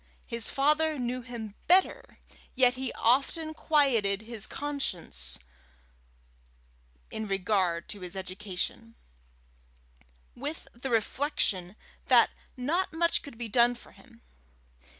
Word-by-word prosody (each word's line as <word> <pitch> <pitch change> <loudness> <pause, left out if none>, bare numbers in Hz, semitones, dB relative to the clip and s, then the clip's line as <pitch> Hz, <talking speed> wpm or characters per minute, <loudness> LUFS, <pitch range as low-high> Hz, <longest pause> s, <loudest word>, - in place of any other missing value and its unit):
His 230 -2 -2
father 305 +2 +2
knew 250 0 -2
him 230 -4 -7
better, 370 +2 +3 0.4
yet 250 -1 +6
he 260 -1 -4
often 285 +7 +2
quieted 235 -11 +2
his 225 -2 -3
conscience 180 - -3 1.7
in 220 -1 -4
regard 185 -3 0
to 205 - -7
his 180 +1 -6
education, 195 +4 -4 1.4
with 290 +6 -6
the 250 +3 -5
reflection 215 - +1 0.3
that - - +6 0.3
not 320 +9 0
much 335 +1 +2
could 280 -5 -11
be 235 -1 -3
done 240 +2 +4
for 240 - -15
him. 235 -2 -19
240 Hz, 110 wpm, -29 LUFS, 205-280 Hz, 1.7 s, yet